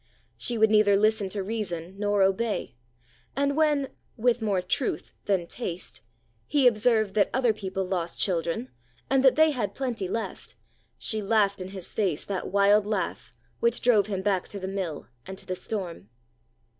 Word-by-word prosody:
She 240 - 0
would 220 0 +4
neither 210 -2 +5
listen 210 -1 +2
to 195 0 -3
reason 190 -5 -4
nor 205 -1 +2
obey; 205 +4 0 0.6
and 280 0 +1
when—with 270 -5 0
more 205 -4 +1
truth 180 +8 -2
than 190 -4 +1
taste—he 130 - -4
observed 220 -3 +3
that 210 - +3
other 250 -3 +3
people 190 -2 -3
lost 175 -2 -3
children, 165 -8 -1 0.4
and 270 -1 +4
that 265 - +6
they 315 0 +5
had 210 -8 -3
plenty 240 -8 -2
left, 225 +5 -5 0.4
she 215 -1 -2
laughed 200 -2 +2
in 185 - -5
his 190 -2 -6
face 185 -8 0
that 195 -2 -3
wild 200 +1 +4
laugh 210 -1 -3 0.2
which 235 0 +2
drove 215 -5 +4
him 195 -3 -3
back 195 -3 0
to 200 - -7
the 190 - -4
mill 190 -6 -4 0.2
and 190 0 -7
to - - -11
the 185 - -3
storm. 180 - -5
205 Hz, 160 wpm, -27 LUFS, 185-230 Hz, 0.6 s, that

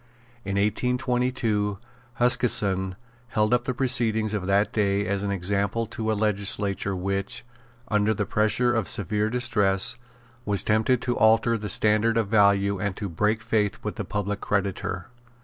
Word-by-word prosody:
In 100 - -4
1822, 120 -1 0 0.4
Huskisson 100 -7 +2 0.3
held 105 -1 0
up 120 0 +1
the 130 - -1
proceedings 115 -4 +1
of 100 -3 -3
that 100 +2 +1
day 100 -1 +1
as 100 -1 -1
an 100 - -2
example 100 +4 -1
to 110 0 -3
a 110 - -1
legislature 100 -1 0
which, 95 +3 -3 0.4
under 105 -2 +1
the 105 -1 -1
pressure 110 +4 +1
of 115 -5 -1
severe 105 +2 +1
distress, 115 -3 0 0.5
was 100 -4 +3
tempted 110 +3 +1
to 120 -1 -1
alter 115 +1 +4
the 105 -2 -4
standard 110 +2 +3
of 110 -3 0
value 100 -2 +3
and 100 -1 -2
to 100 - -4
break 105 +6 0
faith 110 -3 0
with - - -5
the - - -3
public 105 -1 -3
creditor. 95 -2 -2
105 Hz, 150 wpm, -25 LUFS, 100-115 Hz, 0.5 s, alter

